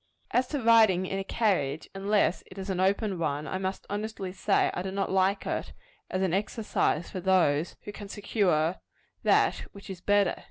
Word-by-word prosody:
As 250 +1 +2
to 290 +2 -2
riding 220 -6 +5
in 195 +1 -3
a - - -2
carriage, 185 -9 0
unless 195 -1 +1
it 185 - -13
is 195 0 -4
an 185 - -2
open 195 0 +1
one, 150 -2 -1
I 185 - -3
must 190 0 -3
honestly 205 -2 -4
say 195 +1 +1
I - - -3
do 190 - -4
not 195 0 -2
like 190 +1 +2
it, - - -3 0.4
as 185 +1 -1
an 185 -3 0
exercise 200 -4 0
for 185 - -4
those 175 -4 +2
who 205 - -7
can 205 -1 -9
secure 185 -6 +1 0.4
that - - +3 0.2
which 200 -1 -10
is 180 -2 -8
better. 205 -1 +2
195 Hz, 190 wpm, -28 LUFS, 185-205 Hz, 0.4 s, riding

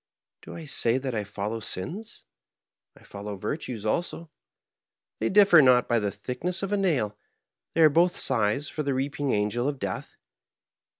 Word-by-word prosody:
Do - - -10
I 165 - -8
say 120 -4 +1
that 130 -1 -3
I 105 -2 -1
follow 105 +2 -4
sins? 160 - -6 0.7
I - - -19
follow 100 +1 -7
virtues 110 - -5
also; 170 +5 -2 0.9
they 110 - 0
differ 195 -5 +7
not 125 -3 +5
by 120 -1 +2
the 105 -1 -1
thickness 165 - -4
of 195 - -3
a 205 - +2
nail, 145 - 0 0.6
they - - +3
are 155 - +8
both 175 +4 +3
scythes 130 +3 +2
for 155 - -4
the 140 -2 -1
reaping 140 +1 -2
angel 105 +3 0
of 145 -1 -2
death. 100 -6 -5
130 Hz, 165 wpm, -26 LUFS, 105-160 Hz, 0.9 s, are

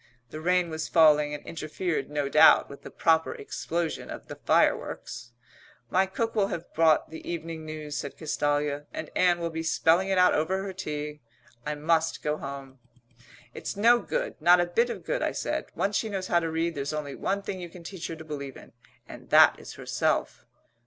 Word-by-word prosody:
The 155 - -7
rain 180 0 +2
was 160 0 -3
falling 150 -2 +5
and - - -10
interfered 160 0 -3
no 145 -1 -1
doubt - - +6
with 140 - -11
the - - -9
proper 160 0 +2
explosion 170 +3 -4
of - - -9
the - - -6
fireworks. 120 - 0 0.6
"My 190 +1 +3
cook 225 +4 -2
will 205 -3 +2
have 170 -3 -6
bought 160 -1 +3
the 160 - -8
Evening 165 -1 -5
News," 155 -1 -5
said 140 - -5
Castalia, 145 -1 -1
"and 155 - -6
Ann 180 -1 +4
will 170 -1 -2
be 160 0 -3
spelling 165 +3 +2
it 190 - +1
out 180 0 +5
over 190 +5 0
her 195 -1 -5
tea. 150 -4 -5 0.5
I 150 - -1
must 160 +2 0
go 150 0 0
home." 135 -2 -8 0.7
"It's - - -6
no 235 +3 +5
good - - -3
not 175 +1 +6
a 175 - +3
bit 230 +8 +1
of - - -6
good," - - -1
I - - 0
said. - - -2
"Once 200 +1 0
she 220 - -2
knows 190 -2 -4
how 175 - +4
to 165 -1 -3
read 165 +1 -1
there's 140 0 -3
only 150 -2 -4
one 200 +6 -2
thing 190 -2 -5
you 175 - -7
can 170 0 -13
teach 180 0 -6
her 165 - -5
to 160 0 -11
believe 140 -3 -6
in - - -15 0.3
and - - -12
that - - +6
is - - -10
herself." - - -1
165 Hz, 200 wpm, -27 LUFS, 150-180 Hz, 0.7 s, doubt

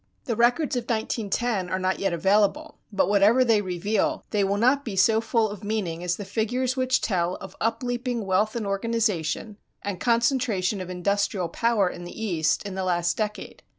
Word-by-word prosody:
The 235 -5 -1
records 245 +6 +2
of 245 -2 -2
1910 220 -3 -1
are 185 - 0
not 185 0 -1
yet 195 -1 0
available, 195 +4 +1
but 195 - +1
whatever 205 +6 +4
they 225 -3 +3
reveal 190 +3 -1
they 210 -2 +2
will 195 +1 0
not 255 +6 +3
be 220 -7 -5
so 220 +4 +4
full 225 -1 +1
of 205 -1 -9
meaning 195 -6 -2
as 175 -1 0
the 205 - -7
figures 245 +5 -1
which 255 0 +1
tell 180 -3 0
of 190 -1 -10
upleaping 240 +1 -1
wealth 200 +4 +1
and 230 -3 -2
organization 205 -2 -1 0.3
and 200 -3 -4
concentration 230 -5 +1
of 185 - -7
industrial 185 0 -1
power 230 0 +1
in 175 0 -6
the 175 - -9
East 165 -7 0
in 200 -2 -6
the 190 0 -3
last 175 -1 +1
decade. 210 -1 -4
205 Hz, 185 wpm, -25 LUFS, 185-230 Hz, 0.3 s, whatever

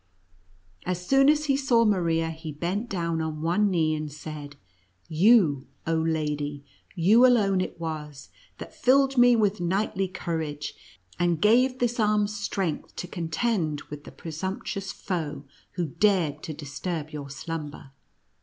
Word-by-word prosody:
As 180 0 -3
soon 270 +4 +5
as 300 0 +3
he 275 -2 +2
saw 250 -4 +3
Maria, 165 -5 +1
he 160 -1 -7
bent 180 +10 -3
down 170 -3 -1
on 155 -1 -4
one 200 +5 +2
knee, 160 -4 +1
and 155 -1 -4
said: 150 -1 -8 0.3
" 90 0 -39 0.2
You, 165 - +5 0.2
oh 165 -1 +1
lady 150 -3 -2 0.2
— - - -29
you 205 +8 +5
alone 205 -7 +4
it 185 - -5
was, 150 -3 -6 0.3
that - - -9
filled 270 +1 +3
me 245 -1 +6
with 210 -3 +1
knightly 190 +2 0
courage, 160 -5 -4 0.5
and 175 -2 +1
gave 250 +6 +4
this 240 -1 -1
arm 210 -1 +3
strength 200 -5 -3
to 180 - -5
contend 165 -2 -1
with 145 -1 -7
the - - -11
presumptuous 190 +4 -5
foe 160 -7 -4 0.3
who 175 -2 -1
dared 165 -3 +1
to 160 - -5
disturb 155 +2 -5
your 145 -2 -7
slumber. 150 -1 -6
170 Hz, 150 wpm, -26 LUFS, 155-210 Hz, 0.5 s, me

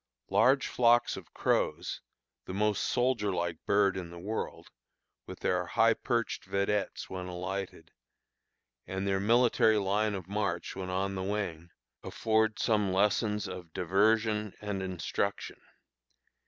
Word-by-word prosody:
Large 135 +1 +4
flocks 120 -1 +3
of - - -10
crows - - 0 0.4
the 95 - -6
most 105 0 +1
soldier 120 -5 +1
like 85 -2 -3
bird 100 -1 +3
in 90 -3 -5
the 85 - -10
world 105 +6 -5 0.6
with - - -9
their 90 0 +1
high 115 +5 +4
perched 115 +1 -2
vedettes 100 +1 -1
when 90 -1 -6
alighted, 95 +2 -5 1.0
and 95 +1 -3
their 95 0 +1
military 115 0 +4
line 105 +1 +1
of 95 -3 -6
march 100 -4 -2
when 95 -1 -5
on 95 +1 -1
the 95 - -3
wing, 95 -4 -3 0.3
afford 110 0 +1
some 105 -4 +1
lessons 105 +2 +1
of 90 -3 -8
diversion 105 +3 +1
and 105 -2 -3
instruction. 95 -3 -3
100 Hz, 130 wpm, -30 LUFS, 95-110 Hz, 1.0 s, Large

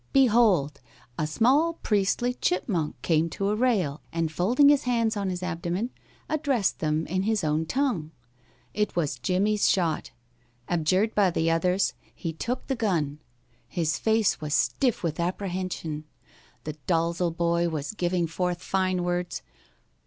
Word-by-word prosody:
Behold! 215 - +4 0.4
a 155 - 0
small 270 - +3
priestly 215 -1 0
chipmonk 180 -7 -1
came 165 0 +2
to 195 +4 -2
a 210 - +1
rail, 210 - +1
and 165 -1 -1
folding 240 - +4
his 290 -2 +3
hands 230 -3 +1
on 200 -2 -1
his 180 0 -4
abdomen, 180 +6 -2 0.4
addressed 280 -9 0
them 155 0 0
in 185 +2 -1
his 215 -1 0
own 155 +1 0
tongue. 250 - 0 0.6
It 210 0 -1
was 145 -7 -1
Jimmie's 200 - +2
shot. 170 -5 0 0.6
Adjured 185 +6 +1
by 200 -3 +4
the 165 -1 +1
others, 180 +3 +1 0.2
he 165 -2 -4
took 240 +10 -3
the 270 - -1
gun. 165 - -1 0.5
His 155 +3 -1
face 220 -5 +2
was 150 0 -1
stiff 250 -8 +1
with 165 -2 -2
apprehension. 180 -4 -3 0.6
The 155 - -4
Dalzel 170 0 +1
boy 170 0 +2
was 150 -3 -3
giving 175 -3 0
forth 180 +2 -2
fine 185 -2 0
words. 175 0 -2
180 Hz, 145 wpm, -26 LUFS, 165-215 Hz, 0.6 s, Behold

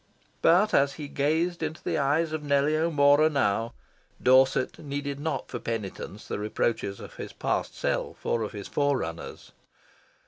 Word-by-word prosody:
But, 185 +6 +4
as 140 0 +4
he 150 -2 -7
gazed 160 +5 0
into 155 0 -4
the 165 -3 -1
eyes 150 +4 +1
of 155 - -2
Nellie 145 +1 +2
O'Mora 155 -1 +4
now, 115 -5 0 0.4
Dorset 130 0 +3
needed 140 -1 -4
not 150 -2 -3
for 120 - -5
penitence 105 -3 -5
the - - -3
reproaches 105 -1 -1
of - - -11
his - - -7
past - - -2
self - - -2
or 115 - +1
of 110 - -3
his 100 -2 -7
forerunners. 135 - -2
140 Hz, 150 wpm, -27 LUFS, 115-155 Hz, 0.4 s, But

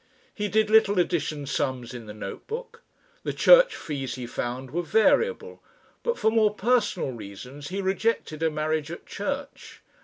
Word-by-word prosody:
He 210 -1 -2
did 215 +1 +2
little 210 -2 +5
addition 155 -4 0
sums 130 -3 -2
in 120 -3 -8
the 105 - -7
note 100 -2 -7
book. 470 +1 -6 0.4
The - - -3
church - - +6
fees 135 -5 -4
he 125 - -6
found 125 +2 -4
were 175 +4 -1
variable, 220 - +2 0.4
but 475 0 -1
for 220 - +2
more 215 -2 +3
personal 210 - +1
reasons 120 +6 -9
he 195 +2 -3
rejected 190 -5 -1
a 165 - +3
marriage 155 0 -1
at 170 - -8
church. - - -6
165 Hz, 160 wpm, -26 LUFS, 130-220 Hz, 0.4 s, church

